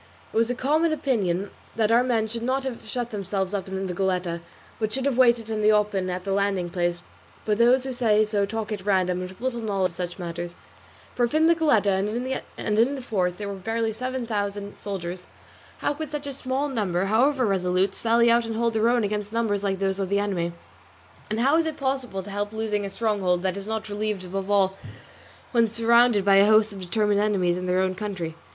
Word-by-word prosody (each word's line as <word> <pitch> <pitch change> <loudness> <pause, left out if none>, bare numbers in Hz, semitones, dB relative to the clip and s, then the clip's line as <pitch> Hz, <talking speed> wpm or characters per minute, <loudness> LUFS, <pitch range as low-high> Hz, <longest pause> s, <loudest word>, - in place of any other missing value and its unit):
It - - -11
was 230 +1 +3
a 245 - -1
common 310 +6 +2
opinion 200 - 0 0.2
that 220 0 +2
our 235 +1 +6
men 230 -3 +1
should 230 +1 -5
not 260 +3 0
have 260 -3 -6
shut 240 -1 -3
themselves 195 -1 -2
up 195 -1 -2
in 190 0 -3
the 180 - -3
Goletta, 180 -2 -1 0.4
but 215 -1 -1
should 265 +3 -3
have 280 -3 +1
waited 235 -3 +4
in 215 -1 -1
the 210 +1 +5
open 205 -3 +1
at 180 0 -3
the 195 - -3
landing 195 -3 0
place; 175 -1 -1 0.4
but 210 0 0
those 250 +2 +5
who 265 -1 -3
say 215 -3 +3
so 210 -1 0
talk 220 +1 -4
at 205 -3 -4
random 185 -3 +1
and 180 - -5
with 190 - -14
little 240 -1 -2
knowledge 195 -4 0
of 170 - -16
such 175 -1 -4
matters; 175 -1 -5 0.6
for 245 - +2
if 240 - -4
in 315 +1 +4
the 335 - +6
Goletta 210 - +2 0.5
and 210 -1 0
in 255 +5 +3
the 270 - -6
fort 180 -6 -1
there 205 - -5
were 200 - -4
barely 225 +3 -2
seven 255 +2 -3
thousand 205 -2 -3
soldiers, 180 -2 -5 0.5
how - - +1
could 310 0 -6
such 295 0 -5
a 280 - -4
small 265 +2 -2
number, 195 -9 -1
however 255 +6 +3
resolute, 185 -1 +1
sally 235 +2 +3
out 235 0 +3
and 225 - -3
hold 230 0 +1
their 220 +1 +3
own 240 -1 +2
against 210 0 -2
numbers 220 -3 0
like 195 -1 0
those 195 0 -1
of 195 -2 -2
the 200 - +2
enemy? 190 -4 -1 0.8
And 215 +2 -1
how 280 +5 +4
is 330 -1 +2
it 315 - -4
possible 265 -8 -2
to 205 - -9
help 205 +1 -2
losing 215 -2 -1
a - - -6
stronghold 195 -4 0
that 190 -1 0
is 200 0 -7
not 220 0 -3
relieved, 210 -2 -3
above 195 +2 -4
all 195 -1 +2 0.7
when 235 -2 +4
surrounded 230 -1 +4
by 195 -1 +6
a 200 +1 +6
host 215 0 +4
of 195 - -8
determined 205 +3 +1
enemies 190 -5 +1
in 180 0 -4
their 180 +1 +2
own 185 0 0
country? 185 -5 -4
210 Hz, 225 wpm, -25 LUFS, 190-235 Hz, 0.8 s, our